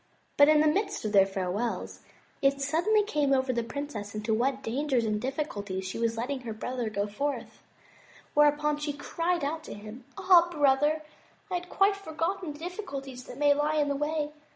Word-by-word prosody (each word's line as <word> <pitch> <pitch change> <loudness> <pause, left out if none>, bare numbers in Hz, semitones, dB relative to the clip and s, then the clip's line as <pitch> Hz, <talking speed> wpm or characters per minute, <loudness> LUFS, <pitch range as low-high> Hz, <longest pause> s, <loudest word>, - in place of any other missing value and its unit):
But 285 +1 +7
in 305 -1 +6
the 310 - +4
midst 395 - 0
of 215 - -1
their 195 -2 +6
farewells, 195 +4 -3 0.4
it 275 0 +3
suddenly 340 +10 +2
came 295 -9 +1
over 260 -1 +2
the 235 - 0
princess 230 -5 -6
into 215 +1 -1
what 260 +4 0
dangers 260 0 0
and 210 -1 -1
difficulties 205 -9 -3
she 190 - -4
was 230 -1 0
letting 260 +4 -2
her 235 -3 -6
brother 240 +1 -3
go 200 -1 -1
forth; 280 +8 -4 0.7
whereupon 295 0 +3
she 295 0 -3
cried 335 +4 -1
out 310 +3 -2
to - - -7
him, 215 +4 -10
"Ah, 365 -3 +6
brother, 295 0 +2 0.5
I - - -2
had 355 0 -3
quite 395 +1 +3
forgotten 335 -2 -3
the - - -12
difficulties 290 - -6
that 245 - -10
may 290 0 +5
lie 295 +2 0
in 295 -2 +2
the 280 - 0
way. 295 +1 -1
285 Hz, 185 wpm, -28 LUFS, 235-310 Hz, 0.7 s, But